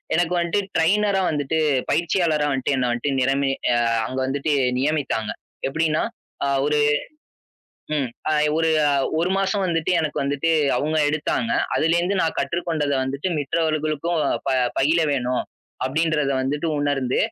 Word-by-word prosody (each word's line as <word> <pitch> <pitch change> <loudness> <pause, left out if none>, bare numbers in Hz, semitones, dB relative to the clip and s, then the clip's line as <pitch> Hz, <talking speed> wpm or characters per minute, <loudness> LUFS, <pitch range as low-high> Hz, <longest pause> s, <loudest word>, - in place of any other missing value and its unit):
எனக்கு 175 +1 +1
வந்துட்டு 170 +4 0 0.2
டிரையினரா 195 +4 +2
வந்துட்டு 145 +1 -1 0.3
பயிற்சியாளரா 165 -3 +1
வந்துட்டு 135 +1 0
என்ன 125 -1 +1
வந்ட்டு 130 +4 -2
நிரமே 135 +1 +1 0.2
ஆ, - - +3 0.3
அங்க 130 - -5
வந்துட்டு 140 +2 -1 0.3
நியமித்தாங்க. 135 -7 -1 0.4
எப்பிடின்னா, 155 +2 0 0.4
ஆ, - - +1 0.2
ஒரு, 150 0 +1 1.2
ம், 135 -4 0 0.2
அ - - +2 0.3
ஒரு, 165 0 +2 0.5
ஒரு 180 +2 0
மாசம் 195 0 0
வந்துட்டு 165 0 0
எனக்கு 155 -2 -2
வந்துட்டு 145 +4 0 0.3
அவுங்க 155 +1 0
எடுத்தாங்க. 155 +9 -1 0.3
அதுலே 165 +2 +2
இருந்து 185 +2 0
நான் 160 - -1
கற்றுக்கொண்டத 155 -1 -1
வந்துட்டு 140 +7 -3
மித்தவர்களுக்கும் 155 +2 -1 0.3
ப - - +2 0.3
பயில 155 +5 +3
வேணும் 125 -2 0 0.4
அப்பிடின்றதை 150 0 +1
வந்துட்டு 145 +4 -2
உணர்ந்து, 140 -3 0
155 Hz, 130 wpm, -22 LUFS, 140-165 Hz, 1.2 s, ஆ